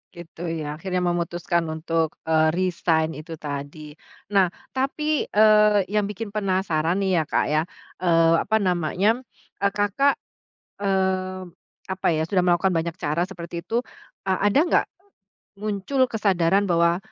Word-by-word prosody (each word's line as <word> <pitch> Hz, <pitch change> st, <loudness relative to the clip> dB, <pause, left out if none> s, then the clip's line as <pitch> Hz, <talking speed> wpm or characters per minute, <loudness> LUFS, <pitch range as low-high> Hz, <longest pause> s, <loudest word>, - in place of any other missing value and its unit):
Gitu 170 Hz, -1 st, -12 dB
ya, 155 Hz, -2 st, -4 dB
akhirnya 180 Hz, 0 st, -2 dB
memutuskan 170 Hz, -1 st, -1 dB
untuk, 160 Hz, 0 st, -1 dB
eee, 160 Hz, 0 st, +3 dB
resign 170 Hz, -3 st, +1 dB
itu 165 Hz, +1 st, -8 dB
tadi. 150 Hz, 0 st, -7 dB, 0.4 s
Nah, 195 Hz, -3 st, +4 dB, 0.2 s
tapi, 295 Hz, +3 st, -1 dB
eee, 210 Hz, -1 st, +5 dB
yang 210 Hz, -1 st, +1 dB
bikin 210 Hz, +1 st, -6 dB
penasaran 185 Hz, -5 st, 0 dB
nih 190 Hz, -3 st, +2 dB
ya, 160 Hz, -, +1 dB
Kak -, -, +1 dB
ya, 155 Hz, 0 st, +3 dB, 0.4 s
eee, 165 Hz, -2 st, +4 dB
apa 220 Hz, -, 0 dB
namanya, 185 Hz, +5 st, +1 dB, 0.4 s
eee, 200 Hz, 0 st, +2 dB
Kakak, 205 Hz, +8 st, +2 dB, 0.6 s
eee, 185 Hz, -2 st, -1 dB, 0.4 s
apa 190 Hz, 0 st, -3 dB
ya, 155 Hz, -, 0 dB
sudah 185 Hz, -3 st, +3 dB
melakukan 175 Hz, +2 st, +3 dB
banyak 165 Hz, -1 st, -1 dB
cara 160 Hz, +4 st, -1 dB
seperti 170 Hz, -2 st, -8 dB
itu, 235 Hz, +2 st, 0 dB, 0.4 s
eee, 190 Hz, -1 st, 0 dB
ada 205 Hz, +6 st, +3 dB
nggak -, -, +3 dB, 0.8 s
muncul 215 Hz, +6 st, 0 dB
kesadaran 195 Hz, -2 st, +2 dB
bahwa, 170 Hz, 0 st, +3 dB
180 Hz, 135 wpm, -24 LUFS, 165-200 Hz, 0.8 s, eee